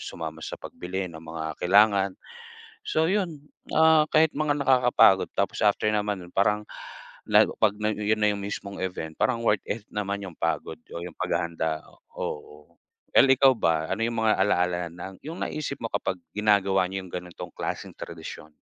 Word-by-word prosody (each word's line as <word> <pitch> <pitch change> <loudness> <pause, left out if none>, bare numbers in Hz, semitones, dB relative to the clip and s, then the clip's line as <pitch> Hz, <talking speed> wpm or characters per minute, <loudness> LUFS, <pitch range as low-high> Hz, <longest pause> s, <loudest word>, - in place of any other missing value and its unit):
sumama 80 -1 -6
sa - - -5
pagbili 95 +1 -5
ng 80 - -10
mga 80 -1 -5
kailangan. 100 +1 +4 0.7
So 160 +1 +2
'yun, 170 -8 -2 0.3
ah, 160 -1 +6
kahit 155 0 +4
mga 145 0 0
nakakapagod 125 -7 +5
tapos - - 0
after 105 +1 +3
naman 105 -1 0
nun 90 - -15
parang 105 +2 +2 0.6
la - - +7 0.2
'pag 105 -2 +4 0.2
'yun 105 +1 0
na 105 - +4
'yung 100 - -5
mismong 100 0 -5
event 90 -4 -4
parang 115 -2 +1
worth 105 -3 +2
it 105 -1 -3
naman 100 -1 -2
'yung 90 -4 -8
pagod 85 0 -2
o - - -6
'yung 90 -2 -8
paghahanda, 85 -3 -1 0.4
oo. 75 +2 -7 0.3
El 135 - +6
ikaw 135 0 +6
ba, 80 -1 +1
ano - - -2
'yung 115 0 -2
mga 110 -1 +3
ala-ala 90 -3 +1
ng 90 +2 -8
'yung 160 +4 -6
naisip 150 -2 -4
mo 115 - -4
kapag 95 - -1 0.2
ginagawa 100 -3 +3
niyo 95 0 -5
'yung 90 - -13
ganitong 90 -1 -7
klaseng - - -4
tradisyon? 75 0 -9
100 Hz, 165 wpm, -26 LUFS, 90-115 Hz, 0.7 s, la